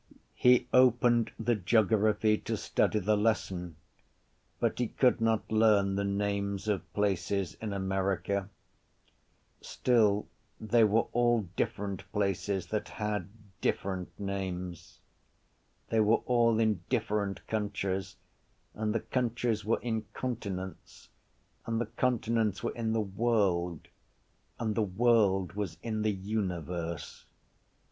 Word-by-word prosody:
He 125 Hz, 0 st, +4 dB
opened 120 Hz, -2 st, +4 dB
the 115 Hz, +2 st, +1 dB
geography 110 Hz, +1 st, +3 dB
to -, -, -3 dB
study -, -, +1 dB
the 105 Hz, +1 st, +2 dB
lesson; 95 Hz, -5 st, -1 dB, 0.8 s
but -, -, 0 dB
he 125 Hz, -, +1 dB
could 125 Hz, 0 st, +2 dB
not 115 Hz, -1 st, +1 dB
learn 105 Hz, -3 st, +4 dB
the 100 Hz, -, 0 dB
names 100 Hz, 0 st, -1 dB
of 105 Hz, -3 st, -2 dB
places 100 Hz, -2 st, 0 dB
in 110 Hz, -2 st, -3 dB
America. 95 Hz, 0 st, -1 dB, 1.1 s
Still 105 Hz, -4 st, +2 dB, 0.3 s
they 115 Hz, +1 st, +3 dB
were 110 Hz, +2 st, +3 dB
all 120 Hz, -1 st, +3 dB
different 100 Hz, -1 st, -3 dB
places 100 Hz, -1 st, -1 dB
that 105 Hz, -1 st, -2 dB
had 105 Hz, -4 st, -3 dB, 0.3 s
different 95 Hz, -2 st, -1 dB
names. 95 Hz, -3 st, -5 dB, 0.9 s
They 115 Hz, -, +2 dB
were 110 Hz, +2 st, +3 dB
all 115 Hz, -2 st, +3 dB
in 110 Hz, -5 st, +2 dB
different 105 Hz, -5 st, -1 dB
countries 100 Hz, -3 st, -2 dB, 0.6 s
and 110 Hz, 0 st, -2 dB
the 115 Hz, -, +1 dB
countries 120 Hz, -3 st, -1 dB
were 110 Hz, +3 st, +1 dB
in 110 Hz, -2 st, -2 dB
continents 100 Hz, -7 st, -5 dB, 0.6 s
and 115 Hz, 0 st, 0 dB
the 120 Hz, -, 0 dB
continents 115 Hz, -3 st, 0 dB
were -, -, -1 dB
in 110 Hz, -1 st, -2 dB
the 115 Hz, -, +1 dB
world 95 Hz, -5 st, 0 dB, 0.7 s
and 110 Hz, -2 st, -1 dB
the 110 Hz, -, 0 dB
world 100 Hz, -2 st, +2 dB
was 100 Hz, -4 st, -4 dB
in 110 Hz, -2 st, -2 dB
the 110 Hz, 0 st, +2 dB
universe. 90 Hz, -5 st, -4 dB
105 Hz, 120 wpm, -30 LUFS, 95-115 Hz, 1.1 s, He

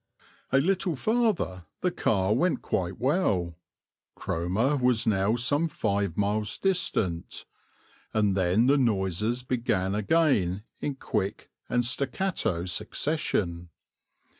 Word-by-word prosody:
A 135 Hz, -, +4 dB
little 180 Hz, +3 st, +1 dB
farther 170 Hz, -, 0 dB
the 180 Hz, -, +1 dB
car 100 Hz, -, +1 dB
went 170 Hz, +9 st, +1 dB
quite 90 Hz, 0 st, -2 dB
well 110 Hz, -, 0 dB, 0.6 s
Cromer 95 Hz, -, 0 dB
was 125 Hz, -4 st, +2 dB
now 105 Hz, +1 st, +2 dB
some 145 Hz, +7 st, +1 dB
five 100 Hz, -, -1 dB
miles 105 Hz, +1 st, 0 dB
distant 110 Hz, -, -1 dB, 0.7 s
and 105 Hz, -3 st, +2 dB
then 95 Hz, +4 st, +3 dB
the 140 Hz, +2 st, +4 dB
noises 105 Hz, +1 st, 0 dB
began 115 Hz, -7 st, 0 dB
again 105 Hz, -, +2 dB, 0.2 s
in 145 Hz, -, -3 dB
quick 100 Hz, -6 st, -3 dB, 0.2 s
and 120 Hz, 0 st, +1 dB
staccato 125 Hz, -, 0 dB
succession. 90 Hz, -, -1 dB
110 Hz, 110 wpm, -27 LUFS, 95-140 Hz, 0.7 s, A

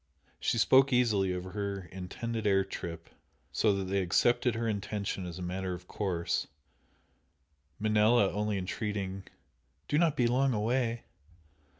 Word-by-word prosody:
She -, -, 0 dB
spoke 135 Hz, +4 st, +5 dB
easily 110 Hz, -7 st, +3 dB
of 90 Hz, 0 st, -3 dB
her 100 Hz, +1 st, -4 dB
intended 110 Hz, +4 st, -4 dB
air 95 Hz, -1 st, +4 dB
trip, 85 Hz, -1 st, -7 dB, 0.4 s
so 110 Hz, -, +2 dB
that 100 Hz, -, -2 dB
they 95 Hz, +1 st, 0 dB
accepted 120 Hz, +6 st, +2 dB
her 115 Hz, 0 st, -1 dB
intention 100 Hz, -3 st, -3 dB
as 85 Hz, -1 st, -7 dB
a 90 Hz, -, -5 dB
matter 90 Hz, +1 st, -3 dB
of 90 Hz, +1 st, -13 dB
course, 90 Hz, -5 st, -1 dB, 1.3 s
Manella 110 Hz, 0 st, +3 dB
only 105 Hz, 0 st, -1 dB
entreating 95 Hz, 0 st, -3 dB, 0.6 s
"Do 145 Hz, -, +2 dB
not 160 Hz, -4 st, +2 dB
be 125 Hz, -, +3 dB
long 130 Hz, +1 st, +2 dB
away!" 115 Hz, +2 st, 0 dB
105 Hz, 135 wpm, -30 LUFS, 95-115 Hz, 1.3 s, spoke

